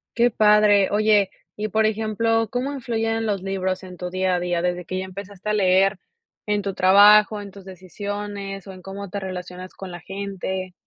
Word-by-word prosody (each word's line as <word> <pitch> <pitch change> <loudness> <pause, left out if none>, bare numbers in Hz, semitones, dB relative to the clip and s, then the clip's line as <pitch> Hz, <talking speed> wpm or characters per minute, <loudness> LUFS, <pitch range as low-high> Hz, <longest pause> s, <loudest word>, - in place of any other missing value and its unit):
Qué 240 +1 +3
padre. 210 -2 +4
Oye, 210 -1 +3 0.3
y 210 +1 -3
por 220 +1 +1
ejemplo, 220 +1 0
¿cómo 255 +5 -2
influyen 225 -4 -2
los 200 -3 -1
libros 190 -1 -2
en 180 -1 -10
tu 180 0 -5
día 185 0 0
a - - 0
día 175 -1 -1
desde 180 0 -1
que 185 +2 -4
ya 190 - -4
empezaste 200 +1 -8
a - - +1
leer 195 -1 +3 0.5
en 210 0 +1
tu 195 0 -3
trabajo, 205 +3 +6
en 200 -1 -9
tus 195 -1 -14
decisiones 195 +1 -6
o - - -7
en 185 - -12
cómo 195 +1 -8
te 200 - -4
relacionas 185 -1 -7
con 190 -2 -9
la 175 - -8
gente? 190 0 -5
195 Hz, 195 wpm, -23 LUFS, 185-210 Hz, 0.5 s, trabajo